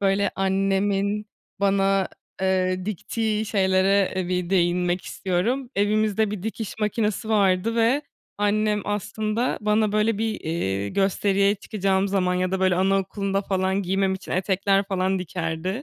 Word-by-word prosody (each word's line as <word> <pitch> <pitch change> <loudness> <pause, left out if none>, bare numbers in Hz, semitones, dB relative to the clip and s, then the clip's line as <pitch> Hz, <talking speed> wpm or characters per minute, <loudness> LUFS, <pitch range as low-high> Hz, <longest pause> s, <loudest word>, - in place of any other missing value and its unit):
Böyle, 195 0 +2
annemin 195 +2 0 0.3
bana, 195 -1 +2 0.3
eee, 185 -1 +1
diktiği 215 +1 -2
şeylere 190 -2 +2
bir 180 -1 -1
değinmek 180 0 +1
istiyorum. 230 +8 -1
Evimizde 215 +1 +1
bir 205 -3 -5
dikiş 220 -1 -4
makinesi 215 +1 -1
vardı 200 +1 +2
ve 235 +6 +3 0.4
annem 210 0 +1
aslında 215 +3 -2
bana, 210 0 +1
böyle 215 0 +1
bir, 220 0 -2
eee, 100 - -2
gösteriye 200 - +2
çıkacağım 195 -1 -1
zaman 185 -2 +1
ya 185 0 0
da, 190 0 -1
böyle, 185 -1 +3
anaokulunda 195 +1 0
falan 190 0 0
giymem 190 +1 +1
için 190 - -7
etekler 195 +1 +1
falan 190 0 0
dikerdi. 180 - -3
195 Hz, 130 wpm, -24 LUFS, 185-210 Hz, 0.4 s, ve